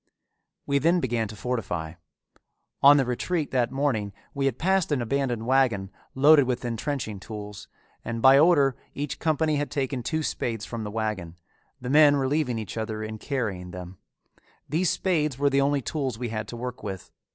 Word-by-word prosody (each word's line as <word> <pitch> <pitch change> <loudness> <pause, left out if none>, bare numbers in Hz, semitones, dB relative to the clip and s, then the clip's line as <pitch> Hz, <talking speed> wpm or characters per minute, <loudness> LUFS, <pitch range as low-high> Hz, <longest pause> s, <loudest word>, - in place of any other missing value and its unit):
We 140 0 +1
then 170 +5 +3
began 120 -6 -1
to 105 - -9
fortify. 100 -9 -3 0.9
On 145 +1 +8
the 135 - +2
retreat 150 +6 -2
that 125 -2 +1
morning 130 -8 -1 0.2
we 140 -1 0
had 130 -3 -1
passed 190 -1 +1
an 145 - +2
abandoned 120 -1 -1
wagon 120 -7 +2 0.2
loaded 145 +1 +6
with 125 0 -2
intrenching 115 -2 -3
tools, 105 0 -8 0.4
and 115 0 -4
by 135 +3 +7
order 145 -5 +4 0.2
each 145 0 -4
company 155 -1 +1
had 145 0 -2
taken 135 -2 -2
two 155 +6 -2
spades 115 -6 -3
from 115 -2 -5
the 105 - -4
wagon, 105 -6 -3 0.4
the 125 0 -4
men 150 -1 +7
relieving 135 -2 0
each 110 0 -6
other 110 -1 -3
in 110 0 -6
carrying 105 -11 -3
them. 90 0 -9 0.7
These 165 +3 +1
spades 155 -8 0
were 140 0 +2
the 140 0 +3
only 140 -1 +1
tools 135 -6 -2
we 120 0 -4
had 110 -1 -4
to 120 - -7
work 125 +1 -6
with. 95 -3 -7
125 Hz, 175 wpm, -26 LUFS, 110-145 Hz, 0.9 s, On